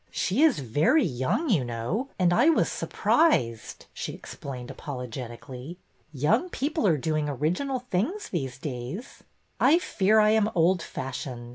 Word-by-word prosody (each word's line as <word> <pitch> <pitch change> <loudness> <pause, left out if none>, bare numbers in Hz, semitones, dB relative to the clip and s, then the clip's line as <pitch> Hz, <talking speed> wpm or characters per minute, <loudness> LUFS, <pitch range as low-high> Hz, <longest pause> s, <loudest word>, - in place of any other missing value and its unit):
She 210 +10 0
is 315 -4 +5
very 145 - +2
young, 135 - -1
you 160 -11 +3
know, 120 - -3
and 175 -2 +3
I 250 - +5
was 330 - +2
surprised," 120 - +1
she - - -5
explained 125 -3 -8
apologetically. 125 +3 -7 0.2
'' - - -39
Young 235 - +3
people 300 - -1
are 160 -4 +3
doing 155 +1 -1
original 175 - -1
things 325 - -1
these 135 -8 -3
days." 135 - -6 0.4
I 320 - +6
fear 215 - +2
I 215 0 +5
am 220 -1 +3
old 175 +1 +3
fashioned. 125 -4 -6
165 Hz, 145 wpm, -27 LUFS, -, 0.4 s, I